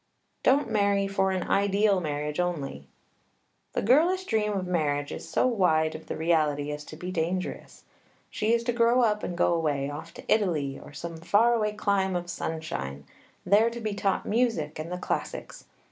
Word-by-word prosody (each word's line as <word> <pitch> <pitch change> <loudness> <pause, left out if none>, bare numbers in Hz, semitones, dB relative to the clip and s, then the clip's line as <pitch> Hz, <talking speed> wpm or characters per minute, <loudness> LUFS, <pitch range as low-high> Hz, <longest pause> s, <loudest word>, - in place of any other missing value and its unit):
Don't 275 0 +3
marry 200 -2 +2
for 195 -1 +1
an 185 -2 -1
ideal 200 0 +3
marriage 150 0 -3
only. 145 - -3 0.9
The - - -1
girlish 330 - +4
dream 215 -5 0
of 190 -2 -2
marriage 145 -5 0
is - - -7
so - - +2
wide 170 -10 +2
of 155 - -9
the - - -4
reality 150 -3 +1
as 150 0 -5
to - - -9
be 180 +3 -6
dangerous. 180 +1 -3 0.5
She 215 +1 0
is 235 0 +2
to 240 0 0
grow 235 +1 +4
up 210 -2 +2
and 175 - -4
go 175 - +3
away, 145 -4 0
off 160 +3 -8
to - - -10
Italy, 160 -10 +1
or - - -12
some 165 +2 -7
far 205 +8 +3
away 210 -2 0
clime 200 -3 0
of 175 0 -3
sunshine; 70 - -4 0.4
there 210 +5 +5
to 235 0 -7
be 215 -2 -2
taught 200 -1 0
music 210 -11 0
and 160 +3 -5
the 180 - -2
classics. - - -4
180 Hz, 180 wpm, -27 LUFS, 155-215 Hz, 0.9 s, there